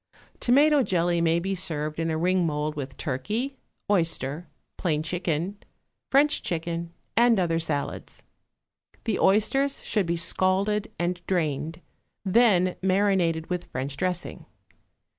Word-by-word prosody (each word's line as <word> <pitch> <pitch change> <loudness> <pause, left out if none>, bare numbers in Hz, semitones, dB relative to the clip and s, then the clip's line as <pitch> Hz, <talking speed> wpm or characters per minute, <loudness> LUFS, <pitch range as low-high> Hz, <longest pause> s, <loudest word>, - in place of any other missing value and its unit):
Tomato 290 +4 +4
jelly 175 -5 +1
may 165 0 +3
be 190 +3 -2
served 155 -4 -3
in 165 0 0
a 160 - 0
ring 180 +2 +2
mould 150 -1 -1
with 135 -3 -6
turkey, 215 - -3 0.3
oyster, 165 -4 0 0.3
plain 155 -4 -1
chicken, 175 +3 -2 0.5
French 290 +2 +3
chicken, 170 0 -3 0.2
and 235 -1 +5
other 165 -2 +1
salads. 155 -3 -4 0.8
The 220 -4 -1
oysters 245 +8 +2
should 205 -5 0
be 170 0 0
scalded 195 +5 +1
and 175 0 -2
drained, 160 -2 -1 0.4
then 190 -3 +4
marinated 185 -4 +1
with 180 -1 -2
French 135 +1 -4
dressing. 180 0 -3
175 Hz, 120 wpm, -26 LUFS, 160-200 Hz, 0.8 s, and